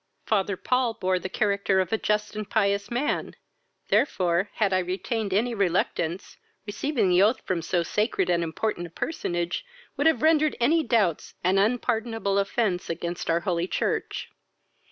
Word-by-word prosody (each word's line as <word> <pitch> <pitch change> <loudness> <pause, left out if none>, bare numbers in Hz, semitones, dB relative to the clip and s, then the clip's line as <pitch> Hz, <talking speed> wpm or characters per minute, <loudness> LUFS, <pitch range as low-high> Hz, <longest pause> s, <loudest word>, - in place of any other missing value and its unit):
Father 200 -2 0
Paul 250 0 0
bore 185 -3 0
the 185 - -5
character 200 -1 +1
of 185 +2 -1
a - - +3
just 210 0 -1
and 215 -1 -5
pious 200 -2 +1
man; 245 +5 -1 0.5
therefore, 185 -5 +2
had 200 -3 +1
I 185 - +3
retained 195 +4 -2
any 230 +5 +1
reluctance, 180 -3 -1 0.3
receiving 220 0 0
the 180 +1 +4
oath 215 +5 +3
from 180 -3 -1
so 170 +1 0
sacred 210 0 0
and 170 -1 +2
important 175 +2 -2
a - - -15
personage 175 - -3 0.3
would 290 - +3
have 320 -1 +2
rendered 310 -1 +4
any 305 +8 +3
doubts 220 - 0
an 185 +2 +3
unpardonable 225 -2 0
offence 200 -2 -1
against 170 +1 -4
our 165 +1 +2
holy 175 0 -1
church. - - -2
200 Hz, 155 wpm, -26 LUFS, 180-225 Hz, 0.5 s, the